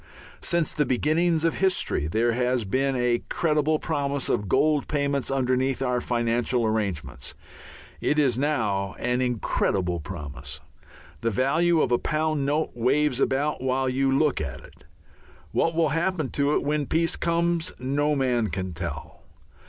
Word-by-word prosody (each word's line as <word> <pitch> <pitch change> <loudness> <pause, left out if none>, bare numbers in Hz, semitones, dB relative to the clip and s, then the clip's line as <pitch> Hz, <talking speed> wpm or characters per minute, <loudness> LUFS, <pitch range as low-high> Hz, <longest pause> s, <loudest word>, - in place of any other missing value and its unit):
Since 170 -2 +1
the 150 - +2
beginnings 160 +6 +2
of 165 - 0
history 185 - +1
there 115 +8 +1
has 125 -1 0
been 135 +6 0
a 125 -1 +1
credible 155 -1 +1
promise 140 -3 -2
of 105 - 0
gold 150 +8 +2
payments 140 -2 -1
underneath 130 0 +1
our 125 -2 0
financial 120 0 0
arrangements. 100 - -3 0.6
It 150 - 0
is 135 -6 +3
now 110 -9 0
an 125 +1 0
incredible 100 -7 0
promise. 75 -3 -7 0.6
The 115 - +1
value 155 - +2
of - - 0
a 120 - +3
pound 155 -2 0
note 150 +2 0
waves 130 +3 +1
about 140 +2 0
while 130 0 0
you 135 +1 +1
look 140 - +2
at 65 -4 -5
it. - - -17 0.7
What 165 0 +1
will 165 -2 +3
happen 165 -1 0
to 145 +1 +1
it - - 0
when 145 -1 -1
peace 165 0 +1
comes 170 0 0
no 145 +4 0
man 125 -5 +1
can 95 -2 -4
tell. 80 -3 -6
135 Hz, 150 wpm, -25 LUFS, 120-150 Hz, 0.7 s, is